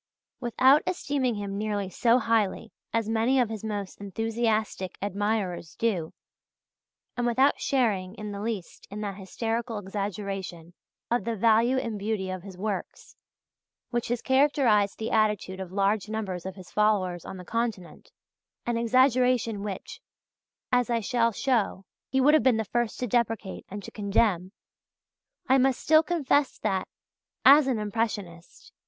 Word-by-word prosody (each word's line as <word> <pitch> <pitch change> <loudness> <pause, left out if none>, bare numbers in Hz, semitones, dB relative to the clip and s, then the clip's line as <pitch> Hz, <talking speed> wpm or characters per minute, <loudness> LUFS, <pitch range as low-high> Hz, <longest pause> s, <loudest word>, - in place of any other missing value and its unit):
Without 260 +4 +4
esteeming 280 -9 -1
him 200 -1 -4
nearly 205 -2 -1
so 230 +5 +3
highly 225 -2 0 0.2
as 230 -2 0
many 225 +4 +2
of 240 -3 +2
his 220 -2 -6
most 205 -3 -5
enthusiastic 220 -2 -1
admirers 200 -4 -2
do, 190 -9 -1 1.0
and 245 -1 0
without 260 +4 +3
sharing 210 -8 0
in 210 -1 -6
the 200 0 -5
least 210 -5 -5
in 205 +1 -6
that 205 -2 -3
hysterical 225 +4 -3
exaggeration 195 -3 -5 0.4
of 240 - +1
the 230 -1 -2
value 230 +4 +3
and 230 -5 -3
beauty 200 -2 -2
of 185 -1 -5
his 190 -1 -11
works 200 -1 -5 0.8
which 240 -1 -1
has 240 0 -2
characterized 260 -7 +3
the 225 - -4
attitude 210 -4 +1
of 185 -2 -6
large 200 +2 +1
numbers 190 -5 -4
of 190 - -6
his 185 -2 -12
followers 195 -5 +1
on 190 - -8
the 180 - -10
Continent 220 -8 -3 0.6
an 240 -1 0
exaggeration 250 -2 +3
which, 200 -2 -6 0.7
as 245 -2 +2
I 235 -1 +1
shall 230 +1 +1
show, 220 -5 0 0.2
he 265 - +1
would 285 +3 +5
have 310 - +6
been 255 -4 +3
the 220 - -1
first 240 +2 -1
to 250 - 0
deprecate 225 -4 -1
and 205 +1 -7
to - - -9
condemn 200 -3 +1 1.0
I 265 +1 +5
must 260 -1 +2
still 315 0 +5
confess 295 -4 +1
that, 190 -3 0 0.6
as 280 +1 +8
an 255 -4 +1
impressionist, 205 -5 -4
_i. - - -64
220 Hz, 150 wpm, -27 LUFS, 195-240 Hz, 1.0 s, as